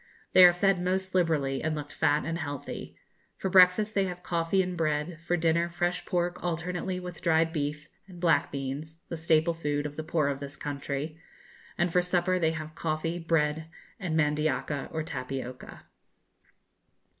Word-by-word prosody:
They 185 - +9
are 175 - +9
fed 185 +1 +2
most 185 +1 -1
liberally, 155 -7 +1
and 160 0 -1
looked 145 -1 -6
fat 150 -1 +2
and 165 0 -2
healthy. 145 -4 -6 0.4
For 190 - -2
breakfast 190 +3 +6
they 195 -1 +2
have 180 -1 -6
coffee 170 +3 +1
and 180 0 -4
bread; 155 0 -1
for 175 +1 0
dinner, 170 +1 +2
fresh 175 +1 -2
pork 175 0 -1
alternately 180 +2 -2
with 180 -2 -8
dried 165 -1 +2
beef, 150 -1 -3 0.2
and 180 -2 -12
black 165 -5 +2
beans 145 +4 -5
(the - - -3
staple 160 +1 +2
food 145 -3 -2
of 145 0 -6
the 155 - -3
poor 155 -2 +1
of 140 -1 -3
this 140 0 -7
country); 145 +2 -4 0.6
and 175 -1 +1
for 180 - +5
supper 180 +1 +1
they 160 -2 +2
have 155 -1 -6
coffee, 165 +1 -2
bread, 160 -1 0 0.3
and 170 -6 -1
mandioca, 150 -2 0
or 160 -1 -2
tapioca. 130 -3 -6
165 Hz, 165 wpm, -28 LUFS, 150-175 Hz, 0.6 s, They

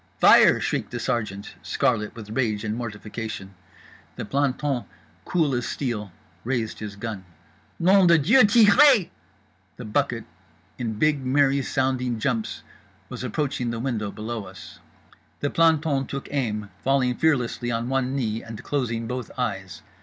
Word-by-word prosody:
"FIRE!" - - +7
shrieked - - -2
the - - -5
sergeant, 105 -4 -3
scarlet 115 -6 0
with 110 -2 -9
rage 110 -4 -1
and 110 0 -2
mortification. 105 -3 -6 0.6
The - - -5
planton, 140 +1 -1 0.4
cool 160 -6 +1
as 120 -1 -1
steel, 110 -8 -3 0.3
raised 120 -3 -2
his 105 -1 -6
gun. 105 -2 -6 0.5
"NOM 190 +1 +5
DE 170 -1 +6
DIEU 220 - +5
TIREZ!" 220 - +6 0.7
The 125 - -8
bucket, 105 - -1 0.5
in 115 -3 -2
big 145 +5 +1
merry 135 +1 +3
sounding 130 -3 -1
jumps, 115 -1 -2 0.5
was - - -6
approaching 135 -5 -2
the 115 -1 -3
window 115 -5 -2
below 110 +1 -5
us. 90 -4 -12 0.6
The 145 - -1
planton 160 -5 +2
took 140 0 -5
aim, 105 -7 -2
falling 135 -2 +2
fearlessly 125 -4 0
on 115 0 -1
one 135 0 0
knee, 115 -4 -1
and 115 -1 -9
closing 115 -5 -2
both 125 0 -4
eyes. - - -4
125 Hz, 140 wpm, -24 LUFS, 110-140 Hz, 0.7 s, FIRE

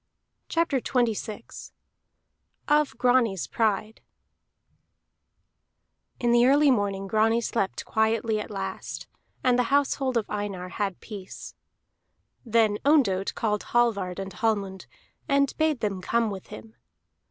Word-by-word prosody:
CHAPTER 330 -5 +1
XXVI 230 -3 -2 0.9
OF 300 0 +2
GRANI'S 240 - +2
PRIDE 215 - -1 2.2
In 240 -1 +1
the 240 +1 +5
early 285 +1 +5
morning 200 -4 0
Grani 220 +3 +2
slept 225 -4 -2
quietly 220 0 +1
at 210 - -6
last, 195 -2 -5 0.4
and 250 -1 +3
the 250 - +3
household 275 -2 +1
of 220 - -1
Einar 200 -3 -4
had 195 -1 -3
peace. 200 -4 -9 0.9
Then 220 -3 +2
Ondott 230 -11 +2
called 210 -2 0 0.2
Hallvard 200 -7 +1
and 195 0 -6
Hallmund, 200 -5 -2 0.4
and 280 -1 +2
bade 315 -5 +1
them 195 -3 -2
come 230 +3 0
with 190 -2 -8
him. 225 0 -11
220 Hz, 115 wpm, -26 LUFS, 200-250 Hz, 2.2 s, the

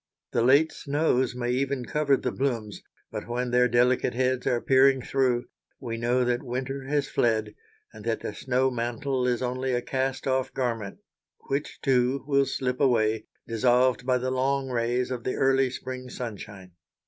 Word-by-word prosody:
The - - +1
late 140 +6 +5
snows 140 -4 0
may 120 -1 -1
even 135 0 -1
cover 145 0 +2
the - - -2
blooms, 115 -6 -2 0.3
but - - -6
when 120 +1 -2
their 125 0 +4
delicate 125 +1 +2
heads 130 0 0
are 120 -2 +2
peering 135 +1 +4
through, 125 -3 +1 0.3
we 115 -1 -4
know 120 +2 +1
that 120 0 0
winter 130 +1 -4
has 145 -1 0
fled, 110 -2 0 0.4
and - - -11
that - - -1
the - - -4
snow 130 0 0
mantle 125 +2 -1
is 125 0 0
only 130 +1 -1
a 120 - +1
cast 130 0 -2
off 130 -1 0
garment 115 -6 -2 0.5
which, 140 +2 -2
too, 130 0 +2
will 140 -1 +2
slip 125 -1 -2
away, 110 -4 +2 0.2
dissolved 125 +2 +2
by 130 0 +2
the 130 +1 -2
long 135 +1 0
rays 120 +1 0
of 125 -2 -4
the 130 - -2
early 135 0 +3
spring 130 0 -7
sunshine. 105 -6 -7
125 Hz, 170 wpm, -26 LUFS, 120-135 Hz, 0.5 s, late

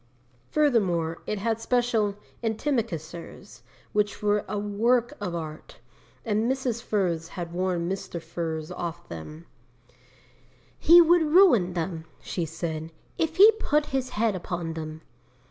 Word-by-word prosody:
Furthermore, 190 - +1
it 215 - -1
had 225 +2 -1
special 230 -5 +1 0.3
antimacassars, 210 - -3 0.3
which 210 0 0
were 205 0 +2
a 210 - -2
work 230 +5 +1
of 180 -4 -3
art, 155 -2 -7 0.5
and 220 +2 +1
Mrs. 255 -3 -2
Furze 175 -8 -1
had 175 -2 -6
warned 180 -1 -1
Mr. 190 -3 -4
Furze 160 -2 -4
off 170 0 -5
them. 150 - -8 1.3
"He 345 +2 +8
would 340 +1 +5
ruin 305 - +5
them," 165 -1 -3
she 175 - -3
said, 160 0 -5 0.3
"if 320 0 0
he 415 +4 +9
put 300 -7 +1
his 260 -1 0
head 220 -1 +2
upon 175 -2 -4
them." 155 -1 -6
200 Hz, 130 wpm, -26 LUFS, 170-240 Hz, 1.3 s, he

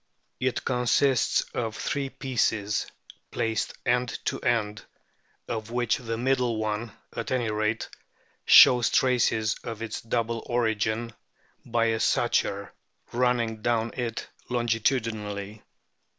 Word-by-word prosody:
It 130 -1 -1
consists 125 +1 +2
of 115 -2 -2
three 140 -1 -2
pieces 110 -7 -1 0.4
placed 110 -1 -2
end 125 0 +1
to - - -1
end, 110 -4 0 0.6
of 110 -1 -4
which 120 -1 +1
the 115 -2 -4
middle 125 -2 +1
one, 110 +1 -3 0.2
at 115 - -4
any 120 -4 0
rate, 110 +1 -1 0.6
shows 125 -1 +8
traces 115 -4 +2
of 115 -1 -5
its 110 -2 -5
double 115 0 -1
origin 115 -1 0 0.5
by 115 -1 +1
a 115 -1 +1
suture - - +1 0.4
running 120 -3 0
down 115 0 0
it 120 -3 -4 0.2
longitudinally. 110 -4 -1
115 Hz, 110 wpm, -27 LUFS, 110-125 Hz, 0.6 s, shows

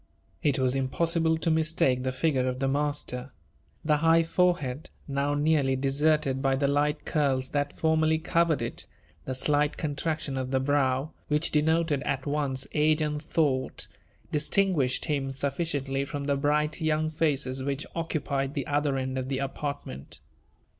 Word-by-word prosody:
It 140 +4 +2
was 130 -1 +1
impossible 160 +5 +1
to 165 +1 0
mistake 155 -5 +2
the 130 0 -1
figure 130 -1 +1
of 125 0 -1
the 135 +1 0
master. 140 -2 -2 0.5
The 150 -1 +3
high 165 +2 +4
forehead, 165 -6 0 0.2
now 140 +1 0
nearly 145 -3 +2
deserted 140 0 +1
by 135 -1 +2
the 140 +1 +1
light 145 +2 +1
curls 135 -4 0
that 145 0 -2
formerly 160 0 +2
covered 165 -3 +1
it 115 - -6 0.2
— 75 0 -32
the 130 - -3
slight 145 +2 +1
contraction 150 -1 -2
of 130 0 -3
the 130 0 +1
brow, 135 +1 +1 0.2
which 150 +2 +1
denoted 160 -1 +2
at 135 -1 -2
once 140 -3 -1
age 155 +1 +3
and 150 -1 -2
thought, 145 -4 0 0.4
distinguished 150 -4 +1
him 140 -4 -1
sufficiently 140 -1 -1
from 140 +1 -5
the 140 0 +1
bright 150 +3 0
young 155 0 +1
faces 140 -4 0
which 140 +2 -2
occupied 140 -4 -2
the 140 -3 -2
other 145 -1 0
end 130 0 -2
of 130 0 -4
the 135 - -1
apartment. 135 - -5
145 Hz, 155 wpm, -28 LUFS, 135-155 Hz, 0.5 s, high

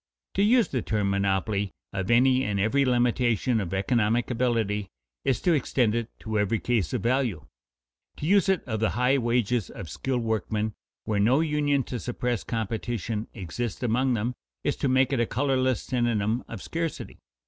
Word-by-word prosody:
To 195 - +1
use 230 +3 +4
the 130 - -1
term 105 -3 0
monopoly 100 0 0 0.2
of 95 -1 -3
any 130 +2 +4
and 100 -1 -1
every 135 +8 +2
limitation 120 -1 +2
of 90 -4 -4
economic 115 +4 +1
ability 115 -5 0 0.4
is 130 -4 +1
to 175 - +3
extend 125 -6 +1
it 115 0 -2
to 110 -2 -1
every 105 +2 +1
case 115 -6 0
of 125 -6 -2
value. 120 - 0 0.7
To - - -5
use 195 +2 +4
it 190 -2 +2
of 110 -4 -3
the 110 - +2
high 125 +3 +3
wages 120 -2 0
of 85 - -8
skilled 130 -3 -2
workmen, 110 0 -1 0.3
where 105 -2 0
no 125 +9 +4
union 145 -3 +1
to 125 - -5
suppress 120 -2 -2
competition 115 -1 -3
exists 110 +4 -4
among 125 +2 +2
them, 115 +3 -1 0.3
is - - 0
to - - 0
make 130 +1 +3
it 130 - +1
a 120 - +2
colorless 130 -2 +1
synonym 120 -2 0
of 110 -5 -7
scarcity. 165 -1 -4
120 Hz, 170 wpm, -26 LUFS, 105-130 Hz, 0.7 s, use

